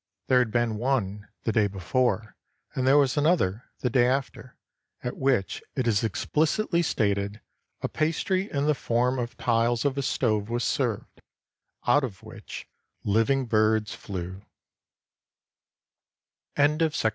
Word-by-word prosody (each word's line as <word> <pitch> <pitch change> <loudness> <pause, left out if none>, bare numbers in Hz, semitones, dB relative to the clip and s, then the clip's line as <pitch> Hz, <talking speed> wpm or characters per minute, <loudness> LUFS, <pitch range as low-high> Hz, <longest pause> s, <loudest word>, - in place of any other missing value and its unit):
There 130 -1 +6
had 125 -2 +2
been 120 -1 0
one, 105 -5 -1 0.2
the 115 - +1
day 105 -1 +3
before, 105 +2 -1 0.4
and 130 0 -1
there 135 +2 +6
was 135 -2 +3
an 145 +1 +3
other, 115 - +1 0.2
the 125 - +1
day 120 -1 +4
after, 130 -1 -3 0.5
at 125 - -3
which 130 -8 0
it 130 - 0
is 105 -2 +2
explicitly 160 - +1
stated, 100 -7 0 0.4
"A - - 0
pastry 185 +5 0
in 140 0 0
the 150 - +4
form 125 0 0
of 120 -2 -4
tiles 115 +1 +1
of 140 -2 +1
a - - +1
stove 110 -5 0
was 120 +1 -1
served, 120 -6 -2 0.6
out 145 +4 +4
of 100 -8 -5
which - - -9 0.4
living 115 +6 +2
birds 110 -1 +2
flew." 95 -1 -6
120 Hz, 135 wpm, -26 LUFS, 105-135 Hz, 0.6 s, There